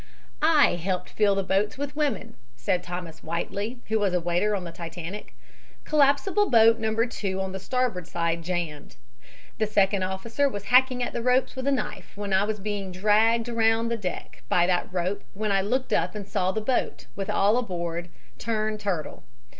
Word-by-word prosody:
"I 305 - +5
helped 180 +1 -2
fill 205 -2 +3
the 195 - 0
boats 195 +4 0
with 285 +1 -4
women," 285 -6 -1 0.2
said 125 +9 0
Thomas 175 -3 -7
Whiteley, 200 +8 -4
who 220 0 +1
was 195 -3 +1
a - - +3
waiter 175 +5 +1
on 190 - -3
the 170 - -6
Titanic. 170 +4 -7 0.5
"Collapsible 305 +8 +3
boat 225 -1 +6
No. 220 0 -1
2 195 -5 -3
on 190 0 -2
the 190 - -5
starboard 235 -5 -1 0.3
jammed. 165 - -4 0.6
The 215 - +2
second 200 -2 +2
officer 225 +9 0
was 205 -5 -6
hacking 255 +3 +4
at - - -3
the 240 - -2
ropes 250 +2 +2
with 260 +1 -4
a - - +4
knife 265 -6 -4
and 205 -1 -3
I 190 +2 +4
was 215 0 -2
being 200 -1 -4
dragged 215 +5 +3
around 225 0 +2
the 235 - 0
deck 190 -6 -6
by 175 - +4
that 180 0 0
rope 185 +2 -2
when 210 +1 -1
I 195 -1 +3
looked 255 +7 -1
up - - +1
and 205 -2 -6
saw 190 -3 0
the 220 - -2
boat, 250 +3 -1
with 195 -1 -4
all 205 +3 +3
aboard, 175 -7 -3 0.3
turn 215 -1 -1
turtle. 185 -7 -3
205 Hz, 185 wpm, -26 LUFS, 185-230 Hz, 0.6 s, boat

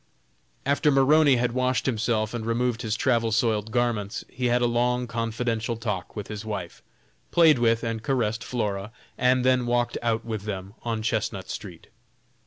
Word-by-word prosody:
After 145 +2 +2
Maroney 145 +1 +5
had 120 0 +1
washed 130 +1 0
himself 110 -3 0
and 120 -2 -3
removed 120 +1 0
his 110 -2 -1
travel 115 -1 +1
soiled 110 -1 +1
garments, 115 -4 -1
he 125 -1 -1
had 120 0 +2
a - - +4
long 125 +1 +1
confidential 115 0 -2
talk 105 -7 -4
with 105 -2 -5
his 105 0 -6
wife, 100 -6 -5 0.5
played 160 -6 +5
with 115 0 +2
and 115 -1 -2
caressed 115 -3 -1
Flora, 105 -4 -3 0.2
and 125 0 +2
then 130 -1 +3
walked 120 0 0
out 115 -1 0
with 110 -3 -4
them 95 -2 -5
on 115 -2 -3
Chestnut 105 -4 -2
street. 90 -5 -8
115 Hz, 165 wpm, -26 LUFS, 110-125 Hz, 0.5 s, Maroney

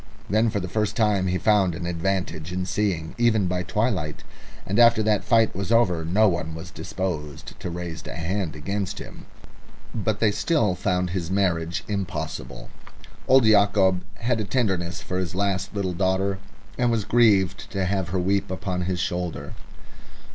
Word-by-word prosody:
Then 110 +2 +3
for 105 - -1
the 90 - -4
first 105 +2 -1
time 105 -4 +2
he 90 0 +1
found 95 -4 +3
an 85 0 -5
advantage 85 -2 -2
in 90 0 -2
seeing, 90 -4 -1
even 110 -4 +3
by 90 0 -1
twilight, 95 -6 -1 0.4
and 100 +4 0
after 115 -2 +6
that 105 -3 +2
fight 115 -3 +3
was 100 +3 -3
over 95 -8 +3
no 100 +7 +3
one 80 -4 -1
was 80 0 -8
disposed 75 -6 -5
to - - -4
raise 85 -1 -6
a - - -6
hand 90 0 -2
against 100 +5 -3
him. - - -10 0.7
But 110 -1 -1
they 110 -2 +3
still 105 - +1
found 90 -1 -1
his 85 -3 -3
marriage 85 -4 0
impossible. 95 - -4 0.6
Old 130 -2 +6
Yacob 100 -3 +4
had 120 0 -1
a - - 0
tenderness 95 -7 -1
for 90 - -2
his 90 -2 -3
last 100 0 -1
little 95 -3 -1
daughter, 95 +2 0 0.4
and 120 -1 +3
was 115 -3 0
grieved 105 -6 +3
to 95 -4 -1
have 95 -2 -1
her 95 - -1
weep 95 +2 0
upon 90 -1 -3
his 90 -1 -2
shoulder. 90 -1 -3
95 Hz, 170 wpm, -24 LUFS, 90-105 Hz, 0.7 s, after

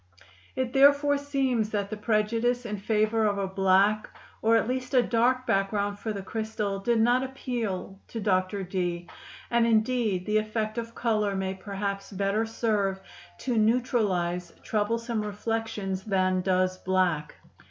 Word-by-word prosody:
It 255 -2 -2
therefore 285 +1 +5
seems 265 -6 0
that 205 -1 -2
the - - -2
prejudice 230 +3 0
in 210 -2 -3
favor 215 +2 +1
of 200 -1 0
a 200 - 0
black 195 +2 +2 0.3
or 225 +1 +4
at 225 - +2
least 255 +1 -2
a 250 - +6
dark 245 +3 +2
background 200 0 0
for 220 - -3
the 200 -2 -5
crystal 215 -2 -3
did 230 +3 +1
not 240 +3 +4
appeal 235 -8 -4
to 230 - -6
Dr. 195 -1 0
Dee, 175 -2 -3 0.4
and 235 -1 +3
indeed 220 -4 +1
the 215 0 +2
effect 215 +1 -2
of 230 0 -7
color 215 -4 0
may 190 0 -2
perhaps 195 0 -4
better 200 +3 0
serve 210 -4 0 0.4
to 245 -4 0
neutralize 205 -7 +1
troublesome 230 +1 -1
reflections 210 -2 -3
than 185 -2 +1
does 185 0 +1
black. 180 -5 0
215 Hz, 145 wpm, -27 LUFS, 195-230 Hz, 0.4 s, a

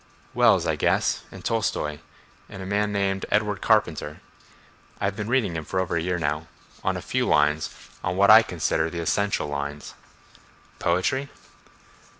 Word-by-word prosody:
"Wells, - - +4
I - - 0
guess, - - +1
and - - -11
Tolstoi, 75 -9 -1 0.5
and 95 - -8
a - - -7
man 105 +2 0
named 100 -1 -1
Edward 105 -2 0
Carpenter. 75 +1 +1 0.8
I've 100 0 -1
been 105 +1 -4
reading 105 -11 0
for 95 - -2
over 95 -2 -1
a 85 - +1
year 90 +1 -1
now—on 75 0 -4
a - - -7
few - - -1
lines, 75 +1 +2 0.3
on 90 0 -1
what 100 +1 +6
I 110 +1 +10
consider 80 -5 -1
the 85 - -7
essential 100 +1 0
lines." 70 0 -5 0.9
"Poetry?" 110 +11 0
90 Hz, 150 wpm, -25 LUFS, 80-100 Hz, 0.9 s, I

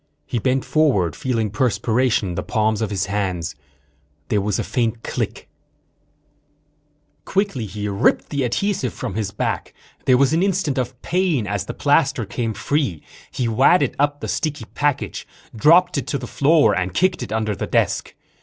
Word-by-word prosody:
He 120 - -2
bent 130 +3 0
forward, 120 - +2
feeling 115 -5 -1
perspiration 120 -1 +1
in - - -3
the - - -2
palms 110 -1 0
of 110 - -1
his 100 -2 -1
hands. 95 -5 -2 0.8
There 105 - +2
was 100 0 -1
a - - -1
faint 115 -2 -1
click._ - - -3 1.8
Quickly 190 - -1
he 105 +2 -4
ripped 100 +2 +1
the 140 -2 -1
adhesive 130 - -1
from - - -4
his 105 -1 -2
back. 100 - -3 0.3
There 125 - +5
was 140 +2 +3
an 165 - +2
instant 185 -8 0
of 125 0 -4
pain 175 - +1
as 100 -1 -2
the - - -5
plaster 140 -5 +2
came 115 +1 -3
free. 105 - -1 0.3
He 125 - -2
wadded 135 +5 +3
up 145 0 +1
the - - -4
sticky 155 -2 -2
package, 145 -2 -1 0.3
dropped 170 +7 +5
it - - -7
to 140 - -1
the 125 - -6
floor 145 +5 +3
and 90 0 -2
kicked 185 -1 +2
it - - -6
under 110 -1 -1
the - - -4
desk. - - 0
125 Hz, 170 wpm, -21 LUFS, 105-145 Hz, 1.8 s, There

